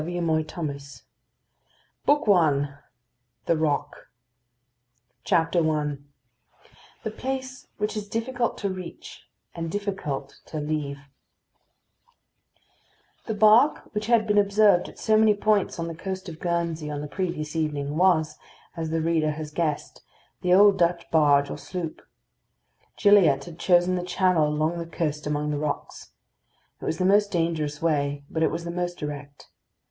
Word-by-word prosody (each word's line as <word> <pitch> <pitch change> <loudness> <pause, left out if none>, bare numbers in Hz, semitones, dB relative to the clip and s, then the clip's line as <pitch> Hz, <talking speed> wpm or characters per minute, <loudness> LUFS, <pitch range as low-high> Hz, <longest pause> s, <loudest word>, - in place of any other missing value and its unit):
MALICIOUS 160 -2 -1
GILLIATT 140 -4 -6 1.0
BOOK 290 -4 +3
I 145 -7 +3 0.7
THE 170 - +2
ROCK 155 -2 -2 1.2
I 155 -3 +1 1.1
THE 220 - -3
PLACE 260 0 -5
WHICH 210 +1 -2
IS 205 -1 -5
DIFFICULT 235 +2 -2
TO 200 - -2
REACH, 185 -2 -9 0.2
AND 165 -1 -4
DIFFICULT 190 -9 -4
TO 155 - -6
LEAVE 150 -2 -2 2.3
The 220 - -2
bark 220 +7 +4
which 210 0 -3
had 230 -2 +4
been 210 -1 +3
observed 200 -2 +4
at - - -16
so 220 - +2
many 215 -1 +5
points 210 -1 +1
on 165 0 -3
the 165 - -5
coast 190 +3 -6
of 160 -2 -8
Guernsey 170 -3 -2
on 145 -1 -4
the 150 - -5
previous 160 -3 -4
evening 150 -2 -2
was, 160 -4 +2 0.4
as 165 -2 -3
the 165 0 0
reader 160 -2 +1
has 155 0 -7
guessed, 150 -2 -2 0.4
the 180 - 0
old 200 +1 +6
Dutch 170 0 +1
barge 145 -3 +4
or - - -6
sloop. 175 -4 -6 1.0
Gilliatt 180 -10 +5
had 170 -1 -11
chosen 175 0 +3
the 180 - -1
channel 180 -3 +2
along 155 +3 -1
the 170 - -5
coast 150 -3 -3
among 150 0 -1
the 145 - -2
rocks. 150 0 -5 0.7
It - - -6
was 160 - -1
the 185 - 0
most 205 +2 +4
dangerous 160 -4 -1
way, 145 -3 0
but 160 - -2
it - - +4
was 165 +1 -4
the 170 - -4
most 175 0 -3
direct. 145 -1 -7
170 Hz, 145 wpm, -25 LUFS, 150-195 Hz, 2.3 s, old